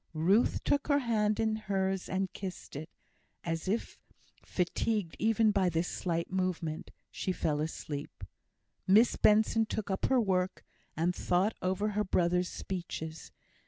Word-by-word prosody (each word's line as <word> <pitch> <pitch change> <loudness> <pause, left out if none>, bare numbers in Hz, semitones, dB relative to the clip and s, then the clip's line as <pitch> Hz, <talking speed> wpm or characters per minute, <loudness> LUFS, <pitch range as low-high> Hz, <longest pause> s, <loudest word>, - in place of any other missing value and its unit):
Ruth 190 +9 +3
took 285 -1 +1
her 285 -2 +4
hand 215 -5 +1
in 220 -1 +2
hers 195 -3 -1
and 190 0 -1
kissed 185 -6 -7
it; 155 +4 -6 0.6
then, 165 - -1
as 165 +2 -5
if 220 +5 -2 0.4
fatigued 185 +1 -1
even 220 0 +3
by 195 -3 +2
this 165 +1 0
slight 170 -1 -2
movement, 180 -4 -2 0.2
she 185 - -2
fell 150 -4 0
asleep. 150 -2 -5 0.6
Miss 215 +6 +6
Benson 220 +1 +4
took 210 -2 -3
up 190 - 0
her 265 -1 +4
work, 185 -4 0 0.3
and 175 +3 +1
thought 190 +5 +1
over 190 +3 0
her 210 0 0
brother's 180 -1 +1
speeches. 160 -4 -6
190 Hz, 145 wpm, -31 LUFS, 175-215 Hz, 0.6 s, Miss